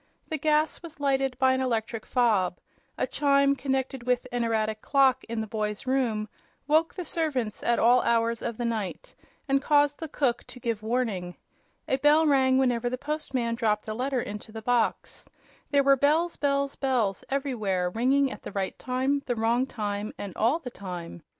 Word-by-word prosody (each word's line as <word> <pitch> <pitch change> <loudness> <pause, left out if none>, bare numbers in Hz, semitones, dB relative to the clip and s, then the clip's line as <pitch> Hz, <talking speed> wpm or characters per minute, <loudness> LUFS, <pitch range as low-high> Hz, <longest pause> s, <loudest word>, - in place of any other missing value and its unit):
The 315 -2 -2
gas 305 +1 +1
was 335 -3 -10
lighted 270 -2 0
by 260 0 +4
an 260 - 0
electric 230 -2 -2
fob; 210 -8 +2 0.4
a - - +1
chime, 280 -1 +3
connected 265 -1 -2
with 250 0 0
an 245 -1 -1
erratic 220 -1 -1
clock 265 -2 +3
in 230 0 -4
the - - -3
boy's 210 +1 -3
room, 245 -5 0 0.4
woke 315 +3 +3
the 365 -2 -5
servants 270 -12 -2
at 235 - +2
all 245 +2 +5
hours 230 0 +1
of 235 -2 -4
the 240 - -2
night 220 -5 -3 0.3
and 275 0 +2
caused 290 0 +3
the 320 - -4
cook 260 -5 0
to 250 - -13
give 230 -4 -2
warning; 215 -6 -2 0.5
a 265 - +1
bell 295 +3 +4
rang 265 -3 +4
whenever 245 -2 +1
the 255 - -3
postman 280 -4 -2
dropped 220 -3 0
a 215 - -2
letter 255 +3 -1
into 210 0 -7
the 220 0 -8
box; 240 -1 -1 0.4
there 280 -1 +3
were 275 0 +6
bells, 310 +6 +2
bells, 280 -1 0
bells 245 -8 0
everywhere, 215 -10 -1
ringing 265 +5 +2
at - - -8
the - - -8
right 195 -2 -3
time, 265 +3 0
the 245 - 0
wrong 235 +3 +1
time 205 -3 -4
and 200 -4 -7
all 235 +8 +2
the 265 -7 -8
time. 175 -5 -7
250 Hz, 180 wpm, -27 LUFS, 220-275 Hz, 0.5 s, were